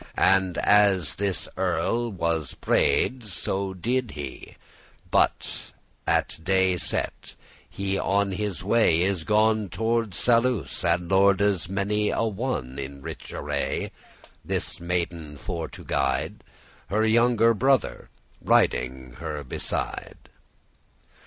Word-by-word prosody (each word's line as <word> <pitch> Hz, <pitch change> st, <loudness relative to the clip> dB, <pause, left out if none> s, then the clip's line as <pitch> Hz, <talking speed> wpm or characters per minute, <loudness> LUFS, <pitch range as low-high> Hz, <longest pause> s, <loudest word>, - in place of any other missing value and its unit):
And 95 Hz, -2 st, +3 dB
as 100 Hz, -6 st, +4 dB
this 100 Hz, -2 st, -1 dB
earl 95 Hz, +7 st, 0 dB
was 85 Hz, -6 st, -2 dB
prayed, 130 Hz, -1 st, +1 dB
so 95 Hz, -1 st, -2 dB
did 120 Hz, +6 st, -1 dB
he, 70 Hz, -3 st, -7 dB, 0.6 s
For, -, -, +5 dB, 0.8 s
at -, -, +1 dB
day 95 Hz, 0 st, +2 dB
set, -, -, -2 dB, 0.3 s
he 100 Hz, 0 st, -2 dB
on 100 Hz, 0 st, +1 dB
his 95 Hz, -2 st, -3 dB
way 100 Hz, -5 st, +3 dB
is 95 Hz, -3 st, 0 dB
gone 110 Hz, +1 st, +2 dB
Toward 115 Hz, 0 st, -1 dB
Saluce, 120 Hz, +2 st, +1 dB
and 85 Hz, 0 st, +1 dB
lorde's 95 Hz, -1 st, +3 dB
many 105 Hz, +2 st, 0 dB
a -, -, 0 dB
one 105 Hz, -, -3 dB
In 70 Hz, 0 st, -7 dB
rich -, -, -8 dB
array, -, -, -2 dB, 0.5 s
this -, -, -3 dB
maiden 85 Hz, -3 st, -3 dB
for 85 Hz, 0 st, -4 dB
to -, -, -12 dB
guide, 65 Hz, -1 st, -1 dB, 0.2 s
— -, -, -28 dB
Her 110 Hz, +2 st, +2 dB
younge 115 Hz, -1 st, +3 dB
brother 130 Hz, -, +1 dB, 0.3 s
riding 65 Hz, +1 st, +1 dB
her 75 Hz, -3 st, -5 dB
beside. 65 Hz, -, -4 dB
95 Hz, 115 wpm, -25 LUFS, 85-110 Hz, 0.8 s, For